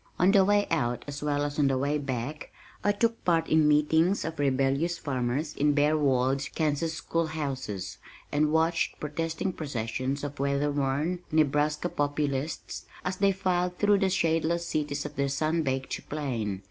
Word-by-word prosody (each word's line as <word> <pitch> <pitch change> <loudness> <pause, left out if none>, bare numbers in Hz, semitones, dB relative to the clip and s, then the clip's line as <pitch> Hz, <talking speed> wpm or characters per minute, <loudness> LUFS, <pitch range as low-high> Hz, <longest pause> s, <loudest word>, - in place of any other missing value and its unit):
On 180 +3 +4
the 195 -1 +6
way 205 +1 +3
out 120 -7 0
as 145 0 -6
well 145 -1 0
as 145 +1 -3
on 145 - +4
the 135 -1 +1
way 145 +3 0
back, 135 +2 -4 0.3
I 205 - +4
took 230 +2 0
part 165 -2 +2
in 155 -1 +4
meetings 160 +5 +3
of 160 -1 -5
rebellious 140 +4 +1
farmers 135 +2 -2
in 145 +1 +2
bare 150 +1 +3
walled 135 -2 +2
Kansas 160 +1 0
school 165 0 -1
houses, 130 -12 -4 0.3
and 150 +1 +2
watched 160 +1 +1
protesting 165 +4 -2
processions 130 -1 -3
of 145 0 -5
weather 140 +1 +1
worn 145 +5 0
Nebraska 150 -1 +2
Populists 145 0 -2 0.2
as 185 +1 -2
they 200 0 +4
filed 180 -2 0
through 205 -1 +4
the 195 -1 +2
shadeless 170 -1 +1
cities 145 -2 -2
of 150 0 -7
their 140 0 +1
sun 155 +4 0
baked 135 -2 -3
plain. 120 -10 -2
150 Hz, 165 wpm, -28 LUFS, 140-165 Hz, 0.3 s, the